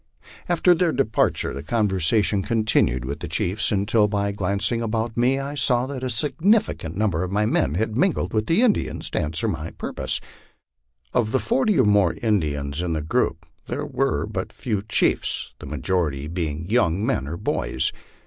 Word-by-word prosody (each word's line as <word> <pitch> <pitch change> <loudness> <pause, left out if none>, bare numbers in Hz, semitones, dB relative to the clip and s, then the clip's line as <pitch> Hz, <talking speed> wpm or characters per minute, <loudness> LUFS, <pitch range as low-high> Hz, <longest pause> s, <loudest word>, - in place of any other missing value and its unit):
After 175 +1 +4
their 170 -1 +2
departure 135 -7 +1
the 70 - -5
conversation 100 +2 +1
continued 105 - +1
with 70 +3 -4
the - - -5
chiefs 100 +6 +1
until, 105 +1 +3
by 100 -1 -1
glancing 100 +4 0
about 115 0 -2
me, 125 +3 +2
I 140 +1 -4
saw 125 -3 +2
that 135 -1 -6
a 130 - -2
sufficient 150 - +1
number 100 -6 +1
of 90 0 -3
my 105 +2 +1
men 75 -8 +1
had 110 +3 -1
mingled 180 +7 +1
with 110 -1 0
the 180 +9 +3
Indians 230 -5 0
to - - 0
answer 80 +9 -1
my 80 -5 -3
purpose. - - -3 0.9
Of 110 -3 +1
the 130 - +2
forty 235 -6 +1
or 130 - +5
more 100 -4 +4
Indians 75 -9 -1
in 90 -2 -1
tho 80 - -1
group, 75 - -1 0.2
there - - -3
were - - 0
but - - -4
few 105 -5 -3
chiefs, 105 - 0
the - - -9
majority 75 -6 -1
being 80 -1 -3
young 100 -3 +1
men 65 - -1
or 85 +4 -4
boys. - - -1
105 Hz, 175 wpm, -23 LUFS, 85-120 Hz, 0.9 s, or